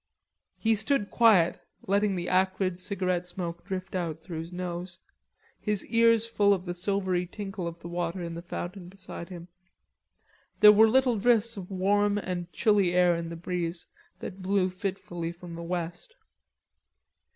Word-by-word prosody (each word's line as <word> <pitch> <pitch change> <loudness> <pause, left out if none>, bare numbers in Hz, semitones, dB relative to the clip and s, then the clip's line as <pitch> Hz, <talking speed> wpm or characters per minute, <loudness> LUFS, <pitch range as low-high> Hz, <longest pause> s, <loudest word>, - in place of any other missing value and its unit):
He 225 0 +2
stood 220 0 0
quiet 210 -8 +5 0.3
letting 200 0 +2
the 175 -1 -3
acrid 185 0 +1
cigarette 185 -2 -1
smoke 170 -2 -5
drift 190 -1 -5
out 165 -4 -3
through 170 -4 -6
his 165 +2 -7
nose, 180 0 -5 0.6
his 210 -2 -1
ears 230 -1 +4
full 205 -3 +3
of 185 -1 -8
the 175 - -3
silvery 185 -1 -1
tinkle 195 -2 -5
of 170 0 -6
the - - -7
water 175 +1 -3
in 170 0 -5
the 170 - -6
fountain 175 +1 -6
beside 185 -2 -9
him. 175 -2 -9 1.1
There 210 - +10
were 220 +2 +7
little 250 -2 +3
drifts 230 +1 +3
of 190 -3 -8
warm 205 +2 +2
and 180 -3 -4
chilly 200 -5 +2
air 180 -1 +5
in 165 0 -4
the 170 - -6
breeze 170 0 -3 0.4
that 190 0 -7
blew 185 0 +1
fitfully 185 -3 -4
from 175 0 -10
the 170 - -6
west. 175 - -5
185 Hz, 160 wpm, -28 LUFS, 175-205 Hz, 1.1 s, There